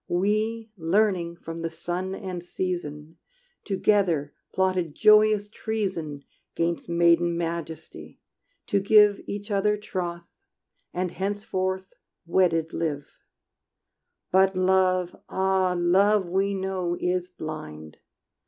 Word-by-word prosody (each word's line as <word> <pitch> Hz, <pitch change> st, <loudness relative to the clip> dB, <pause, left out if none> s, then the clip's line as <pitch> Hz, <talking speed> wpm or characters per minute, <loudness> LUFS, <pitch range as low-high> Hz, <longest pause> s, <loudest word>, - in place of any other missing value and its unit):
We, 215 Hz, +5 st, 0 dB
learning 175 Hz, 0 st, +1 dB
from 165 Hz, -1 st, -8 dB
the 165 Hz, 0 st, -2 dB
sun 175 Hz, +3 st, -4 dB
and 180 Hz, -3 st, -6 dB
season, 165 Hz, -4 st, -4 dB, 0.5 s
Together 185 Hz, -7 st, +1 dB, 0.2 s
plotted 185 Hz, -4 st, 0 dB
joyous 215 Hz, -1 st, +5 dB
treason 190 Hz, -10 st, -4 dB, 0.3 s
'Gainst 170 Hz, 0 st, -1 dB
maiden 170 Hz, 0 st, +3 dB
majesty, 165 Hz, -2 st, -6 dB, 0.5 s
to 200 Hz, -, +1 dB
give 210 Hz, 0 st, +5 dB
Each 205 Hz, +1 st, -5 dB
other 210 Hz, +1 st, +2 dB
troth, 175 Hz, -4 st, -4 dB, 0.7 s
and 180 Hz, 0 st, -2 dB
henceforth 190 Hz, -1 st, -3 dB, 0.3 s
wedded 165 Hz, -2 st, +2 dB
live. 150 Hz, -4 st, -3 dB, 1.2 s
But 190 Hz, +1 st, +4 dB
love, 185 Hz, -1 st, +2 dB
ah, 190 Hz, -1 st, +1 dB
love 190 Hz, +3 st, +3 dB
we 195 Hz, +2 st, +1 dB
know 185 Hz, -2 st, -2 dB
is 180 Hz, 0 st, -1 dB
blind! 80 Hz, -, -8 dB
185 Hz, 100 wpm, -26 LUFS, 170-195 Hz, 1.2 s, joyous